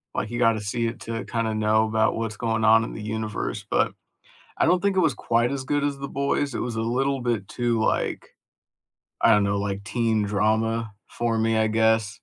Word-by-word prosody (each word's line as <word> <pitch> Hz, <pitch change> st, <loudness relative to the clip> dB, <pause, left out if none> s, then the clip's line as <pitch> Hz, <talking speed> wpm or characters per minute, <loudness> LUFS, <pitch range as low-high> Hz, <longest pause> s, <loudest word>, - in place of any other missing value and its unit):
Like, -, -, -2 dB
you 120 Hz, -, -3 dB
gotta 115 Hz, -2 st, +3 dB
see 115 Hz, +3 st, -1 dB
it 115 Hz, -, -5 dB
to 115 Hz, 0 st, -5 dB
kinda 115 Hz, -2 st, -1 dB
know 110 Hz, +1 st, +2 dB
about 110 Hz, 0 st, +1 dB
what's 115 Hz, -1 st, -4 dB
going 110 Hz, -2 st, -1 dB
on 115 Hz, +1 st, +6 dB
in -, -, -6 dB
the -, -, -7 dB
universe, 110 Hz, 0 st, -4 dB
but -, -, +1 dB, 0.6 s
I -, -, +3 dB
don't 180 Hz, 0 st, +3 dB
think 200 Hz, -1 st, +1 dB
it -, -, +5 dB
was 160 Hz, -6 st, +3 dB
quite 120 Hz, +1 st, 0 dB
as 140 Hz, -1 st, -3 dB
good 145 Hz, +2 st, 0 dB
as 145 Hz, -1 st, -1 dB
The 140 Hz, 0 st, -5 dB
Boys, 140 Hz, -1 st, -1 dB
it -, -, -2 dB
was 120 Hz, -2 st, -3 dB
a 110 Hz, -, -1 dB
little 135 Hz, +3 st, 0 dB
bit 115 Hz, -5 st, -1 dB
too, 120 Hz, -2 st, -1 dB
like -, -, -1 dB, 0.9 s
I 115 Hz, -, +6 dB
don't 105 Hz, -2 st, +4 dB
know, 100 Hz, 0 st, 0 dB
like 100 Hz, 0 st, -3 dB
teen 110 Hz, 0 st, 0 dB
drama 110 Hz, +2 st, 0 dB, 0.2 s
for 115 Hz, -1 st, -1 dB
me, 110 Hz, 0 st, +1 dB
I 110 Hz, 0 st, +3 dB
guess. 110 Hz, -1 st, +2 dB
115 Hz, 215 wpm, -24 LUFS, 110-120 Hz, 0.9 s, on